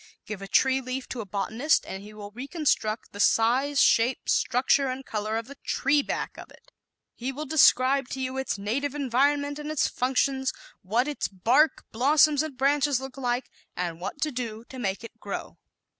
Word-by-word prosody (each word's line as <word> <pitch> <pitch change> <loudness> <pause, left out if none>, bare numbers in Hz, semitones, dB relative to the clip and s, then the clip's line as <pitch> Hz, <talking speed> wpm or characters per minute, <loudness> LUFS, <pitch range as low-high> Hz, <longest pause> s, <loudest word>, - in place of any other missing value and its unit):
Give 210 -2 -6
a 195 - -6
tree 265 +6 +3
leaf 255 +1 -5
to 245 - -4
a 210 - -9
botanist 220 - +1
and 190 - -6
he 210 +1 -11
will 205 -1 -9
reconstruct 250 - -1
the 205 - -10
size, 255 +7 +3
shape, 235 +3 +3
structure 265 +2 +2
and 260 +1 -4
color 215 +1 -2
of 230 - -4
the 280 +3 -12
tree 290 0 +2
back - - -4
of - - -10
it. - - -20 0.4
He 250 +3 -4
will 295 +3 -6
describe 275 -3 +4
to 265 - -5
you 260 0 -3
its 265 -5 -2
native 255 +8 -2
environment 285 +2 +1
and 300 0 -5
its 310 -2 +1
functions; 265 +1 0 0.3
what 225 +7 0
its 295 - -2
bark, 240 - +2
blossoms 290 +4 +4
and 310 -4 -5
branches 280 0 +2
look 265 -1 -8
like 245 -2 -2 0.2
and 175 -2 -3
what 200 - -5
to 305 +1 +1
do 230 -3 -5
to 260 - -8
make 200 -2 -2
it 230 - -11
grow. - - -6
260 Hz, 190 wpm, -26 LUFS, 225-280 Hz, 0.4 s, describe